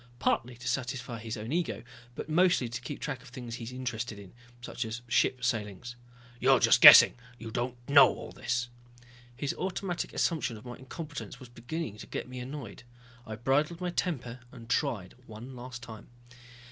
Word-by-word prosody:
Partly 120 0 0
to 125 0 -8
satisfy 125 -2 -3
his 110 +1 -5
own 110 +4 -6
ego, 170 -5 -1 0.3
but - - -6
mostly 170 -4 +3
to 120 +1 -5
keep 135 +3 -6
track 135 -4 -4
of 135 - -15
the 125 - -16
things 120 -2 -7
he 115 - -7
is 115 - -7
interested 120 -3 -4
in. 100 -2 -12 0.3
Such 120 0 -4
as 115 +1 -6
ship 125 +1 +2
sailings." 115 0 -3 0.4
"You're - - +5
just - - +5
guessing - - +11 0.2
you 115 -1 -8
don't 120 +2 -2
know 140 0 +8
all - - -6
this." 125 0 -2 0.7
His 140 +3 -2
automatic 185 -1 -3
assumption 135 -9 0
of 105 - -14
my 120 0 -7
incompetence 130 -4 -8
was 130 -3 -12
beginning 120 0 -5
to - - -9
get - - -5
me 125 0 -7
annoyed. 130 -3 -7 0.5
I 110 - -5
bridled 140 +9 +1
my 180 -1 -2
temper 130 -9 -3
and 115 -3 -12
tried 120 - -1
one 115 +4 -9
last 125 0 -8
time. 110 -2 -10
125 Hz, 185 wpm, -30 LUFS, 115-140 Hz, 0.7 s, guessing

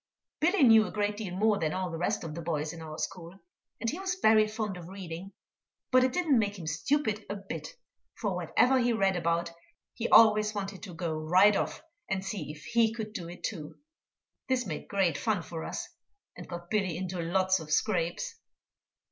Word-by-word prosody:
Billy 330 +1 +3
knew 225 -3 +7
a - - -7
great 205 0 0
deal 195 -5 -5
more 210 +1 +2
than 155 -2 0
all 185 -1 -2
the 165 - -4
rest 205 +5 0
of 160 -2 -5
the 170 - -5
boys 155 -1 -2
in 165 - -9
our 155 -1 -7
school, 175 +2 -5 0.4
and 230 - -3
he 330 - -5
was 380 -1 -1
very 215 - +5
fond 215 -2 -3
of 175 -2 -9
reading, 185 -1 -7 0.6
but 255 0 +6
it 255 - +2
didn't 300 -5 +2
make 205 -1 -1
him 170 - -8
stupid 215 - 0
a 205 - -2
bit, 200 - -7 0.4
for 205 -4 -2
whatever 245 +10 +3
he 240 -1 +2
read 195 -4 +2
about 170 0 0 0.4
he 235 - -3
always 215 -1 +6
wanted 195 -1 -4
to 180 -4 -8
go 165 -1 -2
right 180 +7 +4
off - - -2 0.3
and 190 0 -2
see 200 -4 -4
if 150 0 -12
he 235 -1 +2
could 220 -2 -6
do 170 -5 -5
it 175 - -11
too. 160 -9 -5 0.7
This 255 -2 +1
made 160 -6 -5
great 180 -7 +1
fun 205 -3 0
for 165 -1 -6
us, - - -4 0.5
and - - -10
got 175 0 -8
Billy 190 -6 0
into 185 -1 -3
lots 185 +2 +2
of 155 -1 -9
scrapes. 175 -2 0
195 Hz, 200 wpm, -29 LUFS, 170-220 Hz, 0.7 s, knew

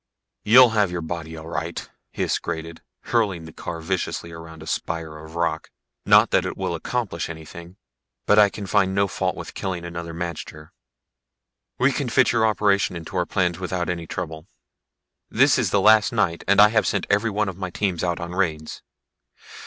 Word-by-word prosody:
"You'll 125 +2 +7
have 105 -4 +2
your 90 -1 -4
body 80 -1 -6
all 80 0 -9
right," 85 +1 -4 0.3
Hys - - 0
grated, 80 0 -6 0.2
hurling 100 -8 0
the 80 - -11
car 85 -1 -6
viciously 85 -1 -3
around 80 -1 -10
a - - -11
spire 80 -1 -4
of 80 +1 -12
rock. 85 0 -1 0.4
"Not - - +6
that - - +3
it - - -5
will - - -2
accomplish 105 -10 -3
anything 85 +3 -10 0.5
but 105 - +5
I 105 -1 +7
can 100 0 -7
find 95 0 +1
no 100 0 +2
fault 90 - -2
with - - -8
killing 90 -3 -4
another 85 -1 -6
magter. 85 -2 -6 1.1
We 130 +3 +3
can 135 -2 -2
fit 130 +1 +4
your 110 -2 +3
operation 100 -3 +1
into 85 +2 -8
our 90 -1 0
plans 90 -2 0
without 90 -2 -3
any 85 -2 -3
trouble. 80 -1 -6 0.8
This - - +4
is - - +1
the - - +2
last 110 -1 +5
night 95 -7 0
and 100 +1 +4
I 105 +1 +9
have 110 0 +2
sent - - 0
every 105 +3 +2
one 105 0 0
of 95 -1 -6
my 95 -2 -3
teams 90 -2 -2
out 85 -1 -1
on 85 0 -5
raids. 80 -4 -2
90 Hz, 185 wpm, -23 LUFS, 80-100 Hz, 1.1 s, I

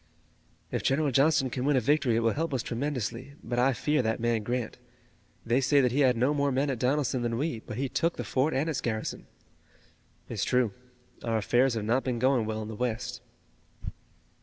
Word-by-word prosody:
"If - - -1
General 140 +1 +1
Johnston 135 -1 +3
can 125 - -3
win 145 +1 +2
a - - +5
victory 140 -1 +2
it 115 - +2
will 115 0 +2
help 160 -2 -2
us 120 - -1
tremendously, 130 0 -3
but 120 +1 -2
I 130 +2 +4
fear 150 +3 +1
that 110 -2 -1
man, 115 -1 +1
Grant. 120 +2 -3 0.7
They 120 +3 +2
say 140 +3 +4
that 125 -3 +3
he 135 - 0
had 130 -4 +4
no 130 +5 +2
more 140 -1 +1
men 135 +2 +1
at 125 - -4
Donelson 130 0 +1
than 115 -1 -1
we, 135 -4 -2
but 110 0 -8
he 135 +1 -1
took 165 +6 -1
the - - -3
fort 135 +4 0
and 140 +4 0
its 155 -5 -2
garrison." 110 -2 -3 1.0
"It's - - -3
true. 125 -5 +1 0.5
Our 115 -1 0
affairs 120 +4 +2
have 110 -2 -2
not 120 +4 +1
been 125 -2 -1
going 125 -2 +2
well 110 0 -3
in - - -7
the 110 - -6
West." 115 -1 -3
125 Hz, 210 wpm, -28 LUFS, 115-140 Hz, 1.0 s, a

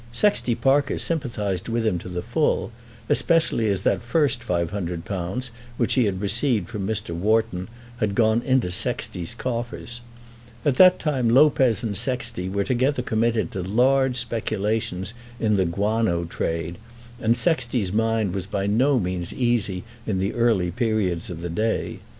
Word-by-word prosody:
Sexty 125 - +1
Parker 140 +2 +2
sympathised 110 - -1
with 115 0 -1
him 95 -5 +1
to 90 - -9
the 90 -1 -4
full, 120 +1 0 0.4
especially 150 -5 +2
as 100 -2 -1
that - - +1
first 135 +1 +1
£500, 90 +3 -3 0.3
which 120 - +1
he 125 -3 +3
had 95 -3 -1
received 105 -1 +1
from 105 -5 -4
Mr. 105 -4 -2
Wharton, 105 +1 0 0.3
had 105 -4 -1
gone 110 +1 +3
into 130 -7 +1
Sexty's 90 -1 -1
coffers. 120 -1 -4 0.6
At 135 -3 +2
that 185 -1 +7
time 130 -6 0
Lopez 130 -2 +4
and 105 -3 -2
Sexty 115 -4 -1
were 100 +1 0
together 130 +3 0
committed 115 -1 0
to 95 - -4
large 125 +6 +2
speculations 110 -4 -1 0.3
in 105 -2 +2
the 95 -2 +2
guano 100 0 0
trade, 85 +1 -3 0.4
and 115 +1 +2
Sexty's 120 - +1
mind 110 -3 +1
was 95 -2 -4
by 100 -1 -2
no 125 +7 +3
means 90 -3 -2
easy 115 -7 0 0.2
in 100 -3 0
the 95 +2 -1
early 110 -7 +2
periods 100 -5 -1
of 85 -2 -6
the 85 - -4
day. 110 +7 -2
110 Hz, 150 wpm, -23 LUFS, 95-120 Hz, 0.6 s, that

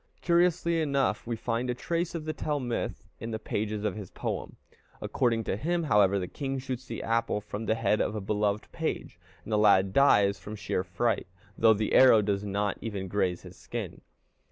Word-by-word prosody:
Curiously 170 -1 +2
enough, 140 -5 0
we 120 - -1
find 115 +2 -2
a 125 - 0
trace 170 +5 -2
of 160 -2 -4
the 155 - -2
Tell 150 -2 -2
myth 120 -3 -3
in 115 - -5
the 110 - -2
pages 105 -1 -3
of 105 -2 -1
his 105 -4 -7
poem. - - -4 0.4
According 115 -4 0
to 95 - -1
him, 170 - -1
however, 100 -8 +4
the 90 -2 -2
king 135 +3 -4
shoots 130 -1 -5
the 115 - -5
apple 115 -1 0
from 105 +2 -6
the 110 - +2
head 110 -1 +1
of 105 - -1
a - - -2
beloved 105 +1 -1
page, - - -4 0.2
and 110 - -5
the 105 - +3
lad 95 -2 +4
dies 100 -7 +4
from 105 - -7
sheer 95 -3 -2
fright, 95 +6 -1 0.3
though 110 -1 +5
the 105 0 -1
arrow 120 -5 +7
does 100 -1 -1
not 100 0 -1
even 100 -4 -4
graze 90 -2 -1
his - - -12
skin. - - -6
110 Hz, 200 wpm, -28 LUFS, 105-130 Hz, 0.4 s, arrow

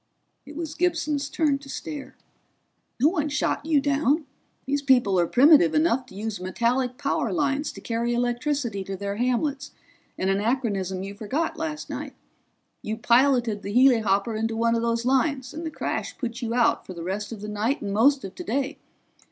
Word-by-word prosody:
It 295 - -10
was 320 -1 -4
Gibson's 305 -4 0
turn 295 -4 +1
to 275 0 -13
stare. 290 0 -6 0.8
"No 285 +6 +5
one 305 -4 -1
shot 295 0 -1
you 310 -3 +4
down! 285 +2 +1 0.4
These 285 +1 0
people 245 -9 +3
are 170 - +2
primitive 275 - +6
enough 300 -5 +2
to 190 - -14
use 210 -1 -4
metallic 245 +6 0
power 285 -1 -1
lines 290 -3 0
to - - -10
carry 235 +1 -1
electricity 240 -3 -1
to 195 0 -5
their 200 +1 -4
hamlets, 270 +4 -1 0.4
an 190 - -1
anachronism 200 -3 -1
you 195 +1 -6
forgot 260 +11 -2
last 315 -2 -4
night. - - -6 0.7
You 215 +1 -4
piloted 235 -2 +3
the 200 +2 -5
helihopper 225 -4 +4
into 225 +1 -1
one 230 0 +2
of 230 - +1
those 230 0 0
lines, 265 0 +1
and 320 - -6
the - - -2
crash - - -4
put 245 -1 -4
you 235 -1 -2
out 240 -2 +3
for 185 - -9
the 170 - -6
rest 200 +4 -3
of 220 -3 -7
the 210 - -6
night 215 +7 -1
and 200 -1 -3
most 265 +6 +4
of 190 - -8
today. 275 +7 -3
245 Hz, 180 wpm, -25 LUFS, 215-285 Hz, 0.8 s, primitive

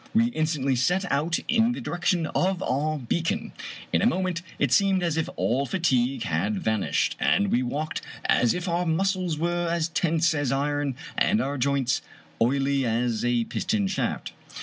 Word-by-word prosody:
We 230 +1 +4
instantly 155 - 0
set 180 +10 +1
out 155 +5 +1
in 235 0 +3
the - - -5
direction 175 -1 0
of 185 +3 0
our 155 +4 0
bea 135 +5 -1
con. 215 +7 -2 0.4
In - - +3
a - - +4
moment 185 -5 0 0.2
it 145 - +1
seemed 195 +3 +3
as 170 -3 0
if 160 - -1
all 135 +4 0
fatigue 135 -9 +1
had 100 +2 -1
vanished, 110 0 0
and 100 -1 +2
we 120 - +3
walked 145 +5 -3 0.2
as 120 - +3
if 180 +1 -4
our 175 0 0
muscles 185 0 0
were 175 +2 0
as 165 -1 0
tense 165 0 +1
as 145 -4 -1
iron 145 0 0 0.2
and 215 - +3
our 140 -6 -1
joints 135 -1 +1 0.4
oily 135 +3 +2
as 115 -1 0
a 120 -1 +2
piston 205 - -1
shaft. 195 - -2
155 Hz, 170 wpm, -26 LUFS, 130-180 Hz, 0.4 s, We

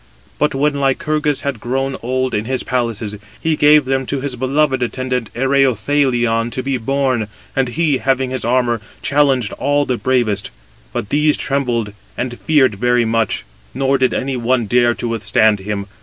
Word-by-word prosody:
But 150 -2 +1
when 145 +2 +2
Lycurgus 150 +2 0
had 140 -5 -3
grown 135 +3 -2
old 130 +1 -1
in 105 0 -1
his 130 +1 -2
palaces, 115 -4 -2 0.2
he 160 -1 0
gave 150 -1 +5
them 135 0 -1
to 140 - -2
his 135 -1 -3
beloved 130 +1 +1
attendant 125 -1 -2
Ereuthalion, 125 -2 +2
to 130 - -3
be 135 -1 -1
borne: 130 -2 0 0.3
and 135 -1 +2
he, 145 +1 0
having 130 -1 0
his 130 -2 -3
armour, 120 -1 +1 0.2
challenged 135 -7 +2
all 145 +1 +1
the 125 -3 -2
bravest: 120 -6 0 0.4
but 100 - -4
these 150 0 +2
trembled 120 -6 -1 0.2
and 125 -1 -4
feared 130 -10 +2
very 120 0 +2
much: 115 0 0 0.3
nor 135 0 +1
did 130 -1 +3
any 135 0 -2
one 120 0 +1
dare 120 +2 +3
[to 120 - -4
withstand 110 -2 +2
him]. 100 0 -4
130 Hz, 165 wpm, -18 LUFS, 120-135 Hz, 0.4 s, gave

